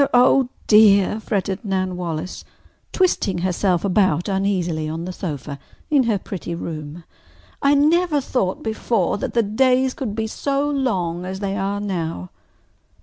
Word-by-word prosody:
oh, 250 +1 +5 0.2
dear!" 210 -1 +5
fretted 200 -2 -2
Nan 185 -3 -1
Wallace, 175 0 -5 0.5
twisting 345 - +1
herself 185 0 +1
about 185 -4 +2
uneasily 185 -5 -1
on 165 +2 -4
the 185 - -5
sofa 145 -6 -5 0.3
in 280 -4 +4
her 220 -3 +1
pretty 180 -2 -6
room. 155 0 -6 0.6
"I 280 +1 +4
never 310 +2 +3
thought 250 -8 -2
before 220 -3 0
that - - -4
the 235 - +4
days 255 +4 +2
could 250 -9 -4
be 220 0 -1
so 280 +5 -1
long 190 -12 -1
as 190 +1 -5
they 195 -1 -2
are 200 +1 -2
now." 165 - -4
195 Hz, 145 wpm, -21 LUFS, 175-240 Hz, 0.6 s, oh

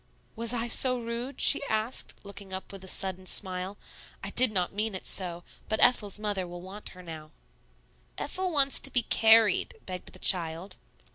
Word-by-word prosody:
"Was 230 0 -1
I 240 -1 -1
so 255 +2 +4
rude?" 235 +3 -5
she - - +3
asked, 220 +2 -2
looking 200 -1 -11
up 190 - -6
with 195 -1 -11
a - - -11
sudden 185 0 0
smile. 185 +1 +1 0.5
"I - - -5
did 255 -2 +6
not 185 -3 -2
mean 210 0 -2
it 185 - -8
so; 175 -2 -2 0.3
but 220 - -1
Ethel's 215 -5 +3
mother 205 -3 -3
will 175 0 -9
want 190 +4 -8
her 180 - -12
now." 160 -2 -10 0.9
"Ethel 370 0 -3
wants 280 -4 +3
to - - 0
be 245 -3 +3
carried," 220 -3 +4
begged 185 -1 -8
the - - -10
child. 170 +1 -1
200 Hz, 180 wpm, -28 LUFS, 185-230 Hz, 0.9 s, did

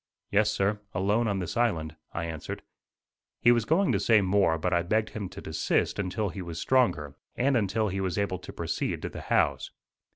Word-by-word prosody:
"Yes, 105 +1 +4
sir, 105 0 0 0.2
alone 105 +5 +2
on 100 -2 0
this 90 0 -4
island," 85 -10 0 0.2
I 85 - -3
answered. 80 -2 -6 0.8
He 120 - +6
was 120 -2 +2
going 180 - +3
to - - +2
say 115 -2 +5
more 95 -4 +3
but 90 +3 -1
I 85 - +3
begged 110 +5 0
him 100 -4 -5
to 95 +1 -9
desist 80 +5 0
until 100 +2 -1
he 90 +3 -6
was 85 -2 -6
stronger, 120 - +2 0.2
and 135 +2 +2
until 110 -1 +1
he 95 +1 -2
was 95 -3 -2
able 100 -3 -1
to - - -9
proceed - - -3
to - - -2
the - - -8
house. - - +1
100 Hz, 200 wpm, -28 LUFS, 90-110 Hz, 0.8 s, He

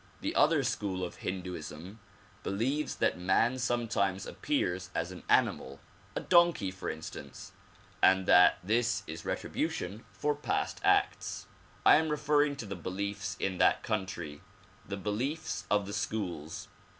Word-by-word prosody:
The - - -2
other - - +4
school 95 -3 -2
of 90 - -5
Hindooism 90 +1 -6 0.4
believes 130 +8 -1
that - - +1
man 115 +8 +2
sometimes 115 -6 0
appears 90 +1 -1
as 85 +2 -1
an 90 - -9
animal, 70 +1 +2 0.4
a - - 0
donkey 170 - +4
for 95 - -5
instance, 80 0 -8 0.5
and 95 0 +5
that 90 0 +7
this 115 +5 +1
is - - -7
retribution 100 +6 -3
for 150 0 0
past 145 - -2
acts. - - +1 0.4
I - - +9
am 160 0 +1
referring 150 -1 +2
to 125 - -6
the 100 -1 -5
beliefs 100 +1 -4
in 95 -2 -1
that - - +4
country, 95 -8 -3 0.5
the 100 - -4
beliefs 120 - -3
of 105 -1 +2
the 100 - -6
schools. 90 -7 -3
100 Hz, 140 wpm, -31 LUFS, 90-120 Hz, 0.5 s, I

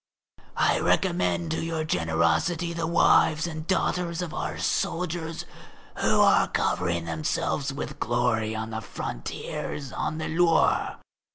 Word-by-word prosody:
I - - +3
recommend 85 -2 +1
to - - -1
your 165 -1 -2
generosity 85 - +1
the 165 -1 -2
wives 160 -1 +4
and 160 -1 -5
daughters 180 -2 0
of 170 - -6
our - - -3
soldiers 165 -2 -2 0.5
who - - +2
are - - +5
covering 85 -1 0
themselves 85 - -1
with 140 - -6
glory 115 -2 0
on 110 +1 -4
the 110 0 -3
frontiers 115 - -5
and - - -5
on 155 - -2
the 160 - -3
Loire. 165 0 +2
150 Hz, 130 wpm, -26 LUFS, -, 0.5 s, are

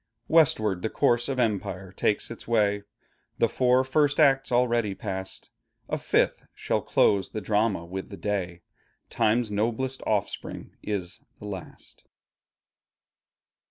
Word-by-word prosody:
Westward 125 - +3
the 110 - -1
course 120 +3 +2
of 135 -2 -2
empire 95 -5 -1
takes 105 +3 0
its 115 - -9
way; 105 -3 +2 0.6
The 115 - +3
four 125 +2 +3
first 145 +2 +2
Acts 135 -3 +4
already 120 -4 +2
past, 95 -3 -6 0.4
A - - -1
fifth - - +1
shall - - -1
close 100 -2 +2
the 110 - -4
Drama 105 -3 0
with 95 +2 -6
the 100 - -8
day; 90 -5 -3 0.5
Time's 110 0 +1
noblest 120 +5 -1
offspring 105 -2 -3
is 95 -4 -4 0.2
the - - -11
last. 95 -4 -9
110 Hz, 125 wpm, -26 LUFS, 100-125 Hz, 0.6 s, Acts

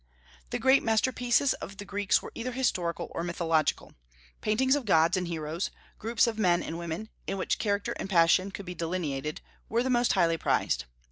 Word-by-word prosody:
The - - -1
great 265 +1 +4
masterpieces 245 +4 +2
of 195 - -8
the 205 - -7
Greeks 200 0 +1
were - - -8
either 250 +2 -4
historical 180 -10 -1
or 170 - -3
mythological. 165 -3 0 0.5
Paintings 260 +6 +2
of 285 -4 -3
gods 165 -3 +4
and 180 -1 -1
heroes, 160 +1 -3 0.3
groups 230 +2 +2
of 225 -2 -2
men 175 -4 +3
and 165 +1 -5
women, 170 +6 -5 0.2
in 195 - -2
which 185 - -1
character 200 -2 0
and - - -4
passion 180 +1 +4
could 200 0 -8
be 180 - -5
delineated, 160 -4 -3 0.3
were 230 +2 +1
the 260 - 0
most 240 -3 +3
highly 165 -4 +2
prized. - - +1
195 Hz, 185 wpm, -28 LUFS, 170-225 Hz, 0.5 s, great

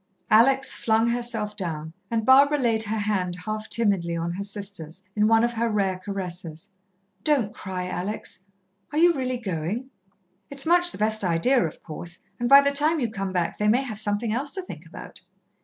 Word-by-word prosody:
Alex 265 +5 +4
flung 225 0 +1
herself 235 -3 -2
down, 160 -5 -5 0.2
and 225 -2 -1
Barbara 280 +3 +6
laid 230 -5 +1
her 220 0 -1
hand 200 -4 -1
half 215 0 -4
timidly 195 -7 +1
on 170 +1 -2
her 190 +3 -4
sister's, 195 -4 -5
in 210 0 +3
one 225 +1 +4
of 240 0 +1
her 230 0 0
rare 195 -3 0
caresses. 180 -3 -6 0.5
"Don't 265 -9 +2
cry, 185 -1 -5
Alex. 190 +1 -5 0.4
Are 300 - -3
you 345 +2 +5
really 255 -3 -2
going? 205 +5 -4 0.6
It's 280 +1 +1
much 350 +1 +4
the - - -8
best 215 0 +2
idea, 185 +9 +2
of 155 - -12
course, 170 +2 -7 0.2
and 240 0 -1
by 275 +1 +9
the 280 0 +1
time 305 +3 +3
you 235 -5 -1
come 195 -3 -4
back 175 -2 -2
they 210 - +1
may 240 +5 +3
have 220 -6 -5
something 215 +1 0
else 280 +7 -2
to 380 - -4
think - - -10
about." - - -10
215 Hz, 190 wpm, -25 LUFS, 190-250 Hz, 0.6 s, by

